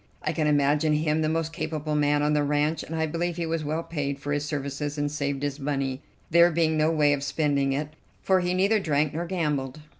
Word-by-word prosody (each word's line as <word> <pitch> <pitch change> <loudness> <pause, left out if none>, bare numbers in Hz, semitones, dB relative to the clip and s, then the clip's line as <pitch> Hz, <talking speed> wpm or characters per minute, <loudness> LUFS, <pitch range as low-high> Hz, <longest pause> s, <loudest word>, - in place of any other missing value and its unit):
I - - -1
can 155 -2 0
imagine 150 +1 +3
him 155 +1 +1
the 155 - +1
most 165 0 -1
capable 155 0 -3
man 145 0 +2
on 150 0 +2
the 150 - +2
ranch, 150 +2 +1
and 165 - -6
I 160 0 +1
believe 170 +2 -2
he 170 - -1
was 160 -1 -2
well 155 +3 -2
paid 140 -4 -3
for 145 +1 -5
his 145 0 -1
services 145 0 -3
and 145 0 -1
saved 140 -1 -2
his 145 0 -2
money, 135 -1 -2 0.3
there 170 +1 +6
being 160 -1 +1
no 155 0 +3
way 150 -3 +3
of 140 - -2
spending 140 -2 0
it, 145 +2 -2 0.3
for 190 -1 +3
he 180 0 0
neither 200 +4 +3
drank 150 -4 0
nor 170 +2 -3
gambled. 150 -6 -2
150 Hz, 230 wpm, -26 LUFS, 145-160 Hz, 0.3 s, there